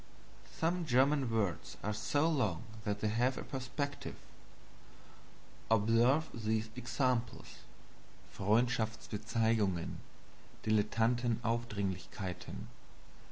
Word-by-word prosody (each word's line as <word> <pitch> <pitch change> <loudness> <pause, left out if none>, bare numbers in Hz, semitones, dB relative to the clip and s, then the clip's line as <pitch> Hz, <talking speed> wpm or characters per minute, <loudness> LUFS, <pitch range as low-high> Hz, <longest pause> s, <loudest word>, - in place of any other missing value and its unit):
Some 170 +1 0
German 135 +1 +4
words 105 -6 -1
are 105 - 0
so 145 +8 +1
long 110 - +1 0.2
that 105 -1 -1
they 110 - +1
have 120 +5 +2
a - - -4
perspective. 140 +1 -4 1.5
Observe 115 +8 +4
these 110 0 -1
examples: 125 0 -1 0.8
Freundschaftsbezeigungen. 110 -2 +1 0.7
Dilettantenaufdringlichkeiten. 110 -4 0
115 Hz, 70 wpm, -34 LUFS, 105-125 Hz, 1.5 s, German